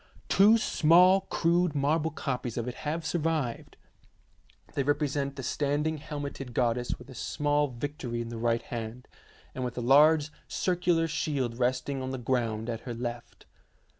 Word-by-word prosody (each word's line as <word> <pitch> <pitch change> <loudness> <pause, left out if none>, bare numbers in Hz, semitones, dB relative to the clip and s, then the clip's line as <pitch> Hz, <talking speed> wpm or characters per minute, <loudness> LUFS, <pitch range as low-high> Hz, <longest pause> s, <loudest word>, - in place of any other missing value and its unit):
Two 210 +4 +6
small 180 -1 +5
crude 170 -1 +2
marble 150 +3 +1
copies 125 -6 -4
of 120 0 -2
it 125 - -3
have 160 +5 -4
survived. 160 -7 -2 1.0
They 140 - 0
represent 145 -1 0
the 135 - -6
standing 145 +4 -1
helmeted 140 -4 -6
goddess 120 0 0
with 125 - -14
a - - -9
small 145 +3 0
Victory 125 -2 -5
in 115 0 -4
the 115 -1 -6
right 115 0 +1
hand, 115 +1 -6 0.5
and 130 - -4
with 125 -1 -4
a - - -1
large 150 +4 +5 0.2
circular 175 -2 +1
shield 135 -7 -2
resting 130 +2 0
on 130 - -4
the 130 - -3
ground 115 -3 -1
at 115 -2 -3
her 120 -1 -6
left. 120 0 -6
140 Hz, 155 wpm, -29 LUFS, 120-155 Hz, 1.0 s, Two